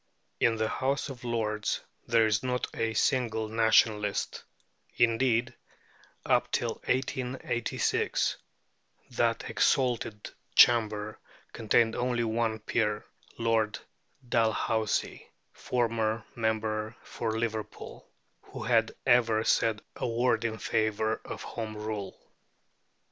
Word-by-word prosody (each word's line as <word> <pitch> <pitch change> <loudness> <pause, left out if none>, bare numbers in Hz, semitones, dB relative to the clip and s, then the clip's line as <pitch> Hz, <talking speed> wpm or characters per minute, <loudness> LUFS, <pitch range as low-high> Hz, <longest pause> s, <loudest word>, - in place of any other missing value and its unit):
In 115 - +3
the 110 0 0
House 135 +5 -1
of 125 -3 -9
Lords 110 -3 -1 0.3
there 115 -1 +4
is 110 -1 +1
not 125 0 -1
a 115 0 -1
single 110 -3 +1
Nationalist; 110 -2 +2 0.5
indeed, 120 0 +2 0.7
up - - +2
till - - -1
1886, 125 -2 -1 0.7
that 115 -2 0
exalted 120 -5 0 0.2
chamber 110 -3 +4 0.3
contained 115 0 +2
only 120 -1 0
one 115 0 0
peer, 105 -1 -1 0.3
Lord 115 -2 +1 0.5
Dalhousie 110 -2 0 0.3
(formerly 115 -2 -1
member 110 -1 -1
for 110 -1 -3
Liverpool), 110 -2 -5 0.3
who - - -9
had - - +2
ever 115 -2 +4
said 110 -2 +2
a - - -2
word 120 -1 +1
in 110 -1 -2
favour 110 0 0
of - - -7
Home 110 -2 -5
Rule. 105 -2 -5
115 Hz, 100 wpm, -29 LUFS, 110-120 Hz, 0.7 s, there